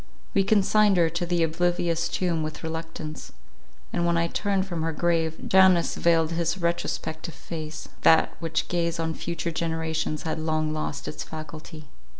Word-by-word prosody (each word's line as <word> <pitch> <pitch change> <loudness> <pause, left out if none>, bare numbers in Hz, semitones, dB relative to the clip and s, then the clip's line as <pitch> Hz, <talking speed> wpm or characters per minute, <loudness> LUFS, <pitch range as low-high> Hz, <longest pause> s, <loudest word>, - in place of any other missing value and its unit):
We 195 - +4
consigned 205 0 +4
her 165 -2 +3
to 170 +1 -2
the 175 -1 +2
oblivious 170 0 0
tomb 175 -3 0
with 155 +1 -5
reluctance; 160 -1 -6 0.6
and 170 - +1
when 170 0 +2
I 170 - +2
turned 195 +2 0
from 175 -4 -4
her 165 +1 0
grave, 165 0 0
Janus 190 -3 +5
veiled 165 -1 +2
his 170 +2 0
retrospective 170 -1 -2
face; 155 -1 -6
that 160 - +5
which 165 -1 -1
gazed 170 -1 -1
on 160 0 -1
future 170 +1 -3
generations 160 -1 -2
had 160 0 -2
long 155 -1 0
lost 155 -2 -4
its - - -5
faculty. 155 -1 -9
165 Hz, 155 wpm, -26 LUFS, 160-175 Hz, 0.6 s, Janus